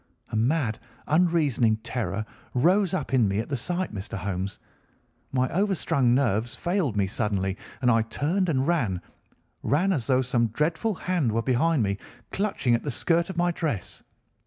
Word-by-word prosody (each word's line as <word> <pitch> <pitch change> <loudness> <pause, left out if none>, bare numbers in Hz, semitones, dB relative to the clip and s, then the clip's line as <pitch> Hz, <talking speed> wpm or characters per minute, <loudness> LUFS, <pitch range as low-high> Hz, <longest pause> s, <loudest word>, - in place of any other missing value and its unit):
A - - -4
mad, 120 0 +1 0.3
unreasoning 150 -9 +3
terror 110 -4 -2 0.3
rose 180 +8 +3
up 180 - -3
in 120 -5 +4
me 100 +1 -1
at 110 - -2
the 140 - 0
sight, 175 +5 -2
Mr. 100 0 -5
Holmes. 95 0 -3 0.7
My 130 -1 +2
overstrung 165 -10 +2
nerves 120 -3 +1
failed 170 - -1
me 100 - +3
suddenly, 95 -1 -1 0.3
and 125 - +5
I 115 -1 +4
turned 165 - 0
and 135 -4 +1
ran—ran 150 - -2
as 130 -9 -2
though 130 -1 +3
some 120 -2 +1
dreadful 160 - 0
hand 170 -8 0
were 115 +1 0
behind 135 +3 +2
me 100 0 -1 0.3
clutching 195 - 0
at 115 - +2
the 145 - -4
skirt 170 +6 +1
of 190 - -6
my 175 0 +2
dress. 150 - -3
130 Hz, 160 wpm, -26 LUFS, 110-170 Hz, 0.7 s, and